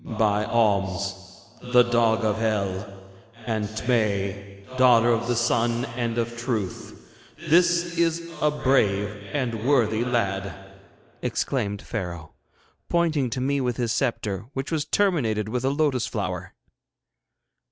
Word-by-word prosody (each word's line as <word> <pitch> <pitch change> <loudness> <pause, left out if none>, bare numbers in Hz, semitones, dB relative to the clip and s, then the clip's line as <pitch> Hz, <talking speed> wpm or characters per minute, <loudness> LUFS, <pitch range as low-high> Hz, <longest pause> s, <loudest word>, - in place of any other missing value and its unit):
'By 105 -1 +1
Oms, 100 -4 +1 0.6
the 125 0 +8
dog 115 -2 +2
of 105 0 0
Hell, 100 -3 -1 0.5
and 110 -2 -1
Tmei, 100 -3 -2
daughter 120 -2 +5
of 115 0 0
the 120 - +1
Sun 120 +1 +1
and 120 -1 -2
of 120 0 -1
Truth, 115 -6 -5 0.4
this 170 +1 +3
is 170 0 0
a 150 - +4
brave 110 -9 +2 0.2
and 120 -6 -2
worthy 120 -4 +2
lad!' 100 -6 -1 0.7
exclaimed 105 -7 -2
Pharaoh, 85 -8 -5 0.6
pointing 160 -6 +1
to 130 - -3
me 140 +1 0
with 125 -2 -1
his 120 -2 -1
sceptre, 115 -6 -1
which 135 +3 -4
was 155 -3 0
terminated 120 - +1
with 125 +2 -2
a 135 - +2
lotus 140 -3 +1
flower. - - -4
115 Hz, 125 wpm, -25 LUFS, 105-130 Hz, 0.7 s, the